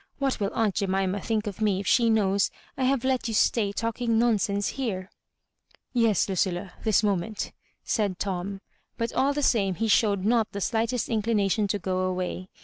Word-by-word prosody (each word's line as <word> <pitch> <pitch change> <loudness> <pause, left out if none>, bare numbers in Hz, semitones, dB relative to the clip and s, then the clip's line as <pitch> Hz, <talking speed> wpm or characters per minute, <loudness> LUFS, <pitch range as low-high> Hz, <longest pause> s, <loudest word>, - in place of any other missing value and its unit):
What 275 -2 -1
will 200 -1 0
aunt 220 -3 +2
Jemima 195 0 0
think 220 0 -1
of 205 0 -6
me 205 -3 +2
if 200 - -5
she 235 +2 +4
knows 200 -3 +2 0.3
I 260 - 0
have 265 -1 +1
let 260 -2 0
you 225 - -2
stay 210 -2 +2
talking 230 +2 -1
nonsense 205 -3 +1
here? 195 -8 -4 0.4
" - - -55 0.3
"Yes, 230 -5 +3
Ludlla 185 -1 -1
— - - -19
^this 220 -1 +3
moment," 200 +1 -1 0.3
said 205 -5 0
Tom; 195 0 -3 0.4
but 230 0 -2
all 275 +2 +2
the 295 - -1
same 195 -8 +2
he 225 +4 -1
showed 200 -3 +3
not 225 -1 +2
the 200 - -3
slightest 230 +3 0
inclina 215 -3 +1
tion 210 0 +1
to 205 - 0
go 185 -1 -2
away. 185 0 -2
210 Hz, 190 wpm, -26 LUFS, 195-230 Hz, 0.4 s, she